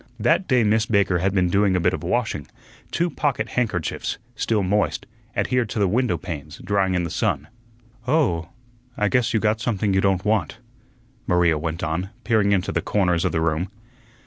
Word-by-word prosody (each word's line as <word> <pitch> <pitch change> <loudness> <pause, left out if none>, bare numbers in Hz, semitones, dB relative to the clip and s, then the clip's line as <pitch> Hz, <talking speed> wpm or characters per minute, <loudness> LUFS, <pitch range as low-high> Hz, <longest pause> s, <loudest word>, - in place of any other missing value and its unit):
That 165 - +2
day 125 -3 +3
Miss 110 +1 +2
Baker 100 -4 +2
had 95 +2 +1
been 90 -3 +1
doing 100 -1 +3
a - - +2
bit 90 +1 +2
of - - -3
washing; 90 - -1 0.4
two 170 - 0
pocket 130 -7 -1
handkerchiefs, 105 -10 -2 0.2
still 110 -3 0
moist, 105 +3 0 0.3
adhered 125 -3 +1
to - - -5
the 100 -2 +3
window 110 -2 +1
panes, 75 -2 -7
drying 95 -2 +1
in 90 - +1
the 85 - -4
sun. - - -1 0.6
"Oh, 105 - +1 0.5
I 105 0 +2
guess 120 +4 +2
you 110 - +2
got 110 +1 +1
something 105 -4 0
you 95 - +3
don't 95 0 +1
want," 110 +1 0 0.7
Maria 85 -3 +3
went 80 +2 -4
on, 85 +3 -2
peering 110 -4 +2
into 95 -2 +1
the - - 0
corners 90 -5 +1
of - - +1
the 80 - 0
room. 80 +3 0
100 Hz, 185 wpm, -23 LUFS, 90-110 Hz, 0.7 s, day